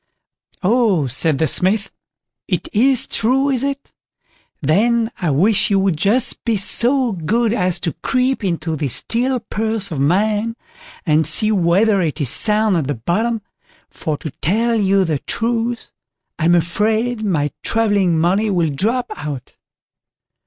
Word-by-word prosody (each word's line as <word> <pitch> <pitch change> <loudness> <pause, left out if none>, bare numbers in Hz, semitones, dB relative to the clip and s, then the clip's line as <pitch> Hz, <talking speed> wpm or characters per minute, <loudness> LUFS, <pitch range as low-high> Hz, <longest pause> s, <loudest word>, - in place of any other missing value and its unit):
"Oh!" 205 - +2
said 140 +4 +1
the 160 - +1
Smith; 195 +5 +1 0.6
"it - - -2
is 255 +3 +3
true, 265 +5 +1
is 260 -1 -1
it? 280 0 -4 0.7
then 225 - +1
I 175 - 0
wish 200 +9 +2
you 200 - +2
would 190 -3 +1
just 215 +10 +2
be 230 -3 0
so 245 +5 +3
good 215 +6 0
as 185 -6 +1
to 165 - -2
creep 255 -2 -1
into 165 -3 -2
this 140 -5 -2
steel 250 +2 -1
purse 220 -2 -2
of 150 - -3
mine, 210 +9 +1 0.5
and 155 -2 +2
see 215 +7 +1
whether 195 +2 +2
it 160 -4 -2
is 140 -5 -1
sound 215 -3 +2
at 150 -5 -2
the 145 - -2
bottom, 215 - -2 0.5
for 155 -2 -4
to 155 - -7
tell 225 - +1
you 195 -3 +2
the 155 -4 -1
truth, 230 - -3 0.5
I'm 170 +2 +3
afraid 215 +7 0
my 150 -8 0
travelling 205 -6 +1
money 190 +7 +1
will 175 -5 +1
drop 225 - -1
out." 145 -4 -7
205 Hz, 145 wpm, -18 LUFS, 165-230 Hz, 0.7 s, is